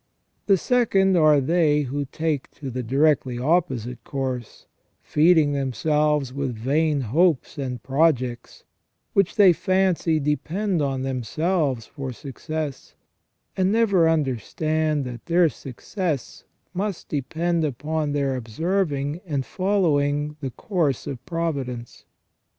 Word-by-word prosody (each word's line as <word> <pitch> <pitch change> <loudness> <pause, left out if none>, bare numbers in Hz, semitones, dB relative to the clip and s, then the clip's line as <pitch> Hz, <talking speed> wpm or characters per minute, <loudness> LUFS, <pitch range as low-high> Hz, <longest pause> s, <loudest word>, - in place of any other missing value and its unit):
The 195 -2 +5
second 195 -4 +2
are 155 -3 +5
they 150 +1 +2
who 140 +1 -3
take 155 0 -2
to 135 -3 -6
the 125 +1 -3
directly 135 0 +2
opposite 130 -4 0
course, 130 -4 -5 0.4
feeding 155 -2 +4
themselves 145 +1 0
with 130 -5 -4
fvain 145 -4 +1
^hopes 160 -2 +2
and 125 -4 -4
projects, 130 -4 0 0.5
which 195 -3 +2
they 195 -4 +7
fancy 185 -3 +1
depend 165 +6 -1
on 135 -2 -1
themselves 135 - -1
for 135 -3 -6
success, 145 +3 -6 0.6
and 190 0 +2
never 200 -7 +3
understanding 155 +2 0
that 120 -2 -8
their 170 -1 +4
success 145 - -5 0.3
must 195 0 -3
depend 165 +4 -1
upon 150 +2 -2
their 140 -2 0
observing 145 - -1
and 140 -4 -2
following 150 -7 +1
the 135 -2 -3
course 155 - -1
of 130 -2 -6
providence. 140 -8 -4
150 Hz, 115 wpm, -24 LUFS, 130-170 Hz, 0.6 s, they